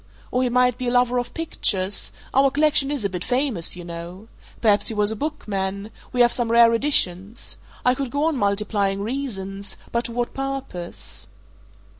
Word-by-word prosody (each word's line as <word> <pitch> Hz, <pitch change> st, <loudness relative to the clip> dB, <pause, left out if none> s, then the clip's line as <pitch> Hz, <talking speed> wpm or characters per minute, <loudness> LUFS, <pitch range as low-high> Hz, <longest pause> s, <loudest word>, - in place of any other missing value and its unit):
Or 250 Hz, -, +1 dB
he 255 Hz, -, +2 dB
might 250 Hz, 0 st, +3 dB
be 250 Hz, -, -2 dB
a -, -, +1 dB
lover 245 Hz, 0 st, +3 dB
of 245 Hz, -, -4 dB
pictures 205 Hz, -, 0 dB, 0.2 s
our 275 Hz, +1 st, +5 dB
collection 290 Hz, 0 st, +3 dB
is 285 Hz, -7 st, -2 dB
a -, -, +1 dB
bit 180 Hz, -1 st, -4 dB
famous, 250 Hz, -, 0 dB
you 175 Hz, -, -8 dB
know. 175 Hz, +5 st, -8 dB, 0.3 s
Perhaps 210 Hz, -3 st, +4 dB
he 225 Hz, -, +2 dB
was 210 Hz, 0 st, +2 dB
a -, -, -3 dB
bookman 205 Hz, -7 st, -3 dB, 0.2 s
we 250 Hz, -, +2 dB
have 240 Hz, 0 st, +5 dB
some 235 Hz, -2 st, 0 dB
rare 235 Hz, 0 st, +6 dB
editions. 225 Hz, -5 st, +1 dB, 0.3 s
I 250 Hz, -, +5 dB
could 265 Hz, 0 st, -3 dB
go 285 Hz, +4 st, -1 dB
on 320 Hz, -1 st, +2 dB
multiplying 200 Hz, -2 st, 0 dB
reasons 200 Hz, -6 st, -4 dB
but 235 Hz, +1 st, 0 dB
to -, -, -3 dB
what 240 Hz, +1 st, -2 dB
purpose?" 260 Hz, -, -4 dB
235 Hz, 180 wpm, -23 LUFS, 200-255 Hz, 0.3 s, rare